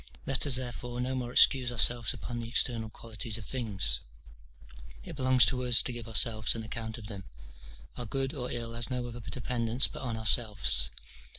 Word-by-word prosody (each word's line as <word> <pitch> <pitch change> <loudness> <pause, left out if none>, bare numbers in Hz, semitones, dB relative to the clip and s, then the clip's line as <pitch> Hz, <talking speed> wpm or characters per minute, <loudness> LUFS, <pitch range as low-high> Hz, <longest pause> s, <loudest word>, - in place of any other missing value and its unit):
Let 135 +2 +2
us, 135 - +5
therefore, 125 -1 -4
no 125 +1 -2
more 125 -2 -4
excuse 125 0 +4
ourselves 120 -1 +1
upon 120 0 -6
the 115 - -6
external 115 -2 -1
qualities 110 0 -3
of 110 - -9
things; 95 - 0 1.0
it - - -9
belongs 130 -2 +4
to 125 -1 -1
us 120 -2 +4
to 125 - -3
give 120 -2 -8
ourselves 110 -1 +2
an 115 - -5
account 110 0 -5
of 115 - -11
them. 100 -3 -8 0.7
Our 125 - -6
good 135 +4 -3
or 125 -4 -5
ill 115 -1 -4
has 120 0 -4
no 125 -1 -3
other 120 0 -8
dependence 120 +1 -1
but - - -10
on 120 -4 -4
ourselves. 105 - +5
120 Hz, 185 wpm, -29 LUFS, 110-125 Hz, 1.0 s, us